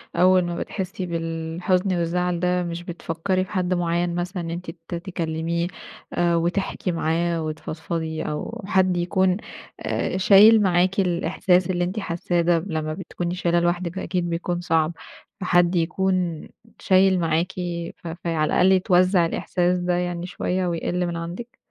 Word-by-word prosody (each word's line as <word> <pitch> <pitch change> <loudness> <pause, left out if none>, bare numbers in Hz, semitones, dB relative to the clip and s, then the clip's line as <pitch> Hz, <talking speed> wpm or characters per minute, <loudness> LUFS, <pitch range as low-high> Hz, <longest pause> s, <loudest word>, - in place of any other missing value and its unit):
أول 185 +1 +5
ما 175 0 -3
بتحسي 190 -1 -4
بالحزن 170 +3 -1
والزعل 175 +1 0
ده 180 0 +1
مش 170 0 -5
بتفكري 175 +2 -2
في - - -16
حد 185 -2 0
معيّن 175 0 0
مثلًا، 180 +1 -3
إن 165 - -5
أنتِ 175 +2 -5 0.2
ت - - -4
تكلميه 170 -1 -2 0.5
آآ، 170 -1 +2
وتحكي 180 +2 -1
معاه، 165 0 0
وتفضفضي، 160 +1 -4
أو 225 +10 -5
حد 185 -2 +2
يكون 185 +1 +2 0.4
آآ، - - -2
شايل 210 +3 +7
معاكِ 185 0 +2
الإحساس 180 0 +2
اللي 175 -1 0
أنتِ 185 +5 -2
حاساه 175 -2 -1
ده 170 0 +3
ب 185 +3 -7
لمّا 155 -1 -2
بتكوني 175 0 -4
شايلاه 175 -1 +1
لوحدِك 175 0 -1
فأكيد 180 -2 -2
بيكون 175 +1 -2
صعب. 165 -1 +1 0.5
فحد 175 0 +3
يكون 180 -1 0 0.3
شايل 190 0 +4
معاكِ 165 +2 0 0.5
ف - - -10
فَي 170 +1 -5
على 155 -1 +1
الأقل 185 +2 +5
يتوزّع 185 -1 +4
الإحساس 180 +2 0
ده 180 0 0
يعني 175 0 -2
شوية 185 0 -2
ويقل 175 +1 -1
من 170 -1 -3
عندِك؟ 175 +9 -7
175 Hz, 150 wpm, -23 LUFS, 170-185 Hz, 0.5 s, شايل